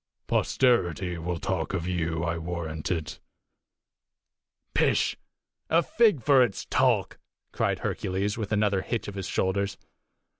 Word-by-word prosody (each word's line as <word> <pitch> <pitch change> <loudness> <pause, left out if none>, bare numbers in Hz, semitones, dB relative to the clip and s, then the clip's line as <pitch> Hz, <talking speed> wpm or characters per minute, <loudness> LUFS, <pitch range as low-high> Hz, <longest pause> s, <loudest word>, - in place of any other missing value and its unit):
Posterity 90 - +1
will 85 +1 -3
talk 95 0 -2
of 85 -3 -2
you, 85 -2 -1
I 85 -1 -1
warrant 80 -2 -4
it." 80 -4 -3 1.5
"Pish! - - +2 0.5
a 165 +2 +4
fig 210 - +3
for 135 0 +6
its 120 -6 0
talk!" - - +1 0.3
cried - - 0
Hercules, 95 +2 -1
with 110 -3 -4
another 105 -2 +2
hitch 115 +3 -3
of 100 - -5
his 95 -2 -5
shoulders. 100 +1 0
95 Hz, 125 wpm, -27 LUFS, 85-105 Hz, 1.5 s, for